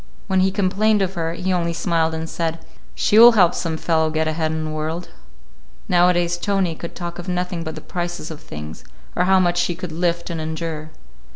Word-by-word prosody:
When 190 -1 +1
we 190 - +3
complained 205 +2 +2
of 190 0 -2
her, 165 -2 -2
he 185 +2 -1
only 170 -1 0
smiled 165 -1 0
and 160 0 -4
said, 165 0 -3 0.3
"She 215 - +4
will 240 +1 +10
help 180 -5 +5
some 165 -2 -2
fellow 160 -1 +1
get 155 0 0
ahead 155 0 -1
in 160 0 -2
the 155 - -4
world." 155 +3 -4 0.8
Nowadays 175 -1 +3
Tony 195 -3 0
could 170 +1 -8
talk 175 -1 -6
of 175 - -8
nothing 180 -1 -2
but 160 -1 -5
the - - -8
prices 175 -2 -4
of 155 0 -9
things, 75 - -8 0.3
or 180 - +2
how 190 0 +5
much 175 -1 +2
she 175 - 0
could 180 -1 -6
lift 170 +1 -1
and 165 -1 -3
endure. 160 -1 -4
170 Hz, 205 wpm, -21 LUFS, 160-180 Hz, 0.8 s, will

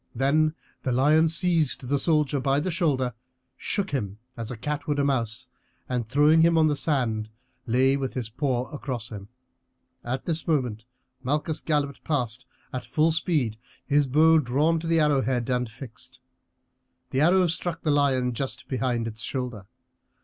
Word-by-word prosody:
Then 155 +5 +2 0.3
the 130 - -1
lion 150 +6 +4
seized 165 -6 +1
the 140 +2 +1
soldier 150 -3 +2
by 135 +2 +2
the 180 +5 -2
shoulder, 140 -8 0 0.4
shook 200 -2 -2
him 105 -8 -3 0.2
as 115 -3 -5
a 125 - -5
cat 150 +5 -4
would 145 -1 0
a 140 - +2
mouse, 125 -2 -1 0.4
and 125 -3 -2
throwing 150 +6 +4
him 165 0 +4
on 160 - +5
the 150 -1 +2
sand 120 -8 -1 0.4
lay 130 +3 +3
with 135 -2 -3
his 125 -4 -2
paw 125 +1 -1
across 130 -6 -5
him. 100 -3 -8 0.8
At 130 +2 -3
this 165 0 -2
moment 125 -9 0 0.4
Malchus 150 +4 -1
galloped 145 -3 -1
past 130 -5 -2 0.3
at 125 -1 -3
full 155 +8 +2
speed, 150 -9 0 0.3
his 145 -1 +2
bow 160 +4 +5
drawn 150 +5 +1
to 165 - -6
the 165 0 +3
arrow 150 -3 +3
head 120 -1 -1
and 125 -1 0
fixed. 115 +1 -11 0.9
The 135 - +1
arrow 180 +4 +5
struck 165 0 -3
the 155 - +2
lion 130 -4 +2
just 135 +3 -5
behind 120 -3 -1
its 110 0 -7
shoulder. 125 -7 -4
135 Hz, 165 wpm, -26 LUFS, 125-155 Hz, 0.9 s, on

